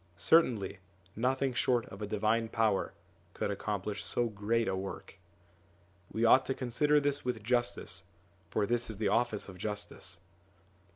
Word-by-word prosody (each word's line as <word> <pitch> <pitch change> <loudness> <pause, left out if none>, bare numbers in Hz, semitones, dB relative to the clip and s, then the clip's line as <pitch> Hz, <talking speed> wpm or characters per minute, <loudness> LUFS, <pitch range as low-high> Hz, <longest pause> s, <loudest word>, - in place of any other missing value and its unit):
Certainly 120 - +3 0.4
nothing 130 +3 +1
short 120 -1 +2
of 95 - -10
a 105 - -2
divine 110 +2 +1
power 110 -4 +1 0.4
could - - -1
accomplish 100 0 -3
so 120 -1 +1
great 110 +2 0
a - - 0
work. 95 0 -7 0.9
We 115 +1 +1
ought 130 +3 +7
to 135 - 0
consider 145 +4 +2
this 145 0 0
with 120 -4 -2
justice, 110 -6 0 0.4
for 100 - +1
this 120 +1 0
is 110 - -4
the 105 -1 +1
office 115 -1 +1
of 95 -2 -10
justice. 100 -3 -5
110 Hz, 150 wpm, -32 LUFS, 100-125 Hz, 0.9 s, ought